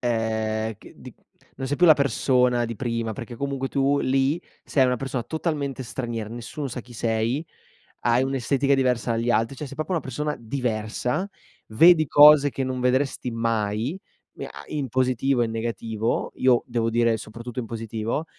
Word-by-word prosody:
ehm, 110 -2 -1
che - - -15
di - - -12 0.4
non 130 - -4
sei 145 +2 -1
più 180 - +3
la 160 - +9
persona 125 -3 +2
di 115 -1 -5
prima. 115 -3 -2
Perché 120 +2 -8
comunque, 135 0 -3
tu 140 +1 +1
lì, 135 +5 +1 0.2
sei 135 -3 +3
una 125 - +1
persona 130 -1 -3
totalmente 145 -4 -3
straniera. 115 -3 -5
Nessuno 120 +5 -6
sa 125 -1 -5
chi 120 +1 -15
sei, 115 +7 -1 0.6
hai 120 +1 +3
un'estetica 135 +1 +1
diversa 125 -3 +1
agli 115 +1 0
altri. 115 +3 +1
Cioè, 150 - -6
sei 140 - -9
proprio 155 +4 -3
una 170 - +1
persona 150 +3 -3
diversa. 125 - -2 0.4
Vedi 160 +8 +6
cose 145 -1 +7
che 135 - -3
non 130 -1 -3
vedresti 125 0 0
mai, 115 - -1 0.4
mi - - -5
ha - - -10
in 145 -3 -3
positivo 130 +1 +1
e - - +3
in 115 - -4
negativo. 115 -1 -2
Io 130 -2 +3
devo 115 -2 0
dire, 115 -1 +2
soprattutto 115 +3 -7
in 120 - -4
positivo. 115 +5 -3
125 Hz, 175 wpm, -24 LUFS, 115-140 Hz, 0.6 s, la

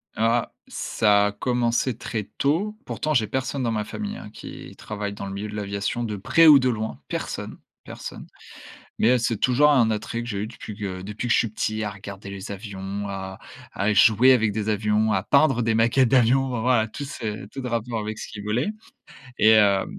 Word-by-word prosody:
Ah! 115 +1 +1 0.2
Ça 105 -1 +2
a - - -2
commencé 120 +2 0
très 110 -2 -4
tôt. 180 +10 0
Pourtant, 155 - -2
j'ai 115 -6 +2
personne 130 +2 -2
dans 115 - 0
ma 105 -1 -2
famille 210 - -5
hein - - -9
qui, - - -10
travaille 105 -1 -5
dans 100 - -7
le 100 - -6
milieu 100 +2 -4
de 105 - -8
l'aviation, 100 +3 -2
de 105 -2 -3
près 165 - +4
ou 145 -2 +9
de 130 -1 +1
loin. 110 - -3
Personne - - -5 0.3
personne, - - -8 0.7
mais 120 +3 +5
heu, - - +4
c'est 115 -1 -1
toujours 130 +7 +4
un 120 -6 +4
attrait 110 +2 -3
que 120 - -7
j'ai 100 - -3
eu - - -2
depuis 110 -2 -9
que 95 -3 -5
depuis 105 +5 -5
que 115 - +3
je - - +4
suis 115 - 0
petit 110 0 -2
à 105 - -2
regarder 100 0 -9
les 100 0 -7
avions, 100 0 -5
à 95 -1 -6 0.3
à 100 +2 0
jouer 110 +5 +6
avec 110 -4 +2
des 105 +1 -2
avions, 105 +1 +1
à 95 -3 +1
peindre 140 -1 +3
des 115 - +1
maquettes 115 +3 +3
d'avion. 130 +1 +4
Enfin 125 -3 -3
voilà, 120 -2 +2
tout 125 +6 -7
c'est 110 -7 -5
tout 135 - -6
de 125 - -4
rapport 115 0 -2
avec 110 0 -5
ce - - -6
qui 105 - -9
volait, 105 +6 -1 0.7
et 110 +1 +6
heu 100 -2 +4
110 Hz, 215 wpm, -24 LUFS, 105-125 Hz, 0.7 s, ou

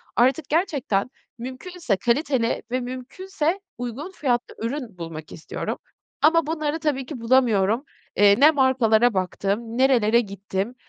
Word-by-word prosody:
artık 260 +5 +2
gerçekten, 290 - 0 0.3
mümkünse 260 - -3
kaliteli 245 - 0
ve 255 - +1
mümkünse 300 +8 -3 0.2
uygun 245 +8 -5
fiyatlı 250 -9 -1
ürün 240 -5 -5
bulmak 165 -2 -8
istiyorum. 160 - -5 0.4
Ama 330 -1 +4
bunları 310 -1 -2
tabii 285 -4 -1
ki 265 -1 -7
bulamıyorum. 230 -2 +3 0.3
Eee, 200 +1 +5
ne 300 +3 +8
markalara 245 -5 +3
baktım, 200 +5 -2
nerelere 240 -4 +4
gittim, 200 +2 -4
250 Hz, 120 wpm, -23 LUFS, 220-295 Hz, 0.4 s, ne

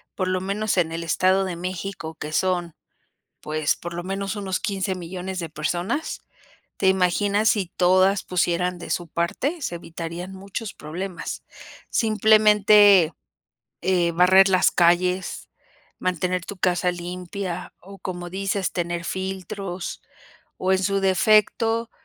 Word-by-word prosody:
por 185 - -1
lo 185 0 0
menos 200 +2 -1
en 165 -3 +2
el 165 +1 -4
Estado 185 +3 +2
de 185 -2 -4
México, 180 -2 -5
que 155 -1 -7
son 175 -2 0 0.7
pues 155 -1 0
por 175 0 -7
lo 175 - -4
menos 195 +2 -3
unos 195 -3 -2
15 195 -3 -2
millones 185 +1 -5
de 165 -3 -4
personas. 175 - -2 0.6
¿Te 190 - +3
imaginas 200 +3 +2
si 200 -4 +1
todas 185 +2 +4
pusieran 180 0 0
de 175 - -9
su 175 -1 -2
parte? 255 - -2
Se 210 - -3
evitarían 170 +2 -6
muchos 200 +2 -6
problemas. 175 +4 -6 0.5
Simplemente, 210 -4 +5 0.7
eh, 175 -2 +1
barrer 185 +3 +6
las 185 -1 +4
calles, 180 +2 +1 0.5
mantener 180 0 -1
tu 200 - -7
casa 180 -1 +1
limpia 180 +1 -6
o, 195 +1 -13
como 175 -2 -6
dices, 195 +1 -1
tener 175 -1 -3
filtros, 190 0 -5 0.6
o 185 - -1
en 190 - +3
su 195 +1 0
defecto, 215 +4 +3
185 Hz, 135 wpm, -23 LUFS, 175-195 Hz, 0.7 s, barrer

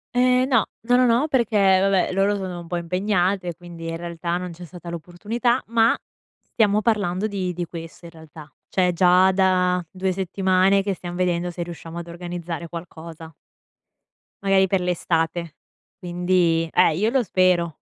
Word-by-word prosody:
Ehm, 250 +1 +3
no, 240 -6 +3 0.2
no, 245 +2 +2
no, 250 0 +5
no, 245 +5 +3
perché, 235 -7 +1 0.2
vabbè, 195 -1 +2
loro 195 +2 +2
sono 185 -3 -5
un 170 - -12
po' 175 +1 -2
impegnate 180 +1 0
e 170 - -6
quindi, 170 -1 -10
in 165 - -4
realtà, 170 0 -3
non 180 0 -5
c'è 175 +1 -10
stata 175 0 -10
l'opportunità, 210 - -2
ma 230 0 +3 0.6
stiamo 210 -2 +2
parlando 205 -3 0
di 190 -3 -3
di 175 0 -4
questo, 165 0 -10
in 170 - -10
realtà. 160 -2 -13 0.2
Cioè 180 -1 +2
già 180 +2 +5
da 185 -1 +2
2 190 0 -2
settimane 190 +1 +2
che 195 0 -1
stiam 175 0 -7
vedendo 175 -1 0
se 175 - -7
riusciamo 170 0 -8
ad 170 - -8
organizzare 170 -1 -6
qualcosa. 165 -1 -9 1.1
Magari 195 -1 +3
per 190 0 0
l'estate, 170 -2 -1 0.4
quindi 175 -2 +1
eh, 155 - +4
io 215 +4 +2
lo 260 -1 +2
spero. 180 -4 +1
180 Hz, 165 wpm, -23 LUFS, 170-195 Hz, 1.1 s, no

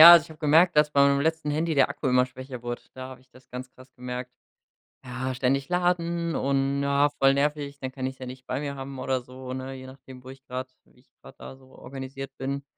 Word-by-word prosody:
Ja, 170 +2 +14
also 170 -3 +8
ich - - -15
habe 155 - -12
gemerkt, 160 +2 +5
dass 150 0 +5
bei 140 -1 +5
meinem 140 0 +3
letzten 160 -1 0
Handy 160 +2 0
der 135 -2 +5
Akku 145 -1 -4
immer 125 0 +5
schwächer 130 -1 -9
wurde. 120 0 -4
Da 130 0 -7
habe 130 -1 -10
ich 130 - -26
das 130 +1 -19
ganz 125 0 -6
krass 130 0 -16
gemerkt. 125 0 -5 0.7
Ja, 130 +1 -3
ständig 135 +2 +1
laden 170 -2 +1
und, 135 +1 +1
na, 140 +1 +3
voll 135 -1 +4
nervig, 145 0 0
dann 130 -1 -4
kann 130 -1 -3
ich's 130 0 -5
ja 130 - -7
nicht 130 +1 -8
nicht - - -44
bei - - -2
mir 140 -1 -3
haben 135 0 -7
oder 130 0 0
so, 130 +1 -8
ne? 130 +1 -5
Je 130 0 -9
nachdem, 130 -1 -12
wo - - -10
ich 135 0 -12
grad 130 +1 -4 0.2
wie - - -27
ich 130 - -31
grad 135 - -13
da 130 - -9
so 130 - -19
organisiert 135 +1 -7
bin. 140 +1 -2
135 Hz, 250 wpm, -27 LUFS, 130-145 Hz, 0.7 s, Ja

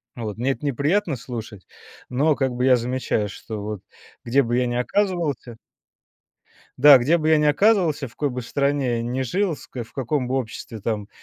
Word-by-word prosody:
Вот, 110 -3 -5
мне 130 +3 0
это 135 - -6
неприятно 150 - 0
слушать, 115 -4 -8 0.4
но 145 +4 +2
как 135 -2 0
бы 125 +1 -1
я 130 - +6
замечаю, 120 -3 -1
что 110 +1 -7
вот 105 -2 -5 0.4
где 135 +4 +2
бы 120 +1 0
я 125 -1 +1
ни 120 - -2
оказывался 150 - -1 1.2
Да, 140 0 +9
где 145 +8 +3
бы 155 -2 -1
я 155 - +5
ни 150 - +1
оказывался, 160 -3 +3
в - - -12
какой 145 - 0
бы 125 -1 -5
стране 140 -1 0
я 115 - -2
ни 125 +3 -2
жил, 175 - -1
с - - -13
в 120 -3 -7
каком 130 0 -1
бы 130 - -1
обществе 115 -3 -4
там 105 -1 -3
130 Hz, 190 wpm, -23 LUFS, 115-145 Hz, 1.2 s, Да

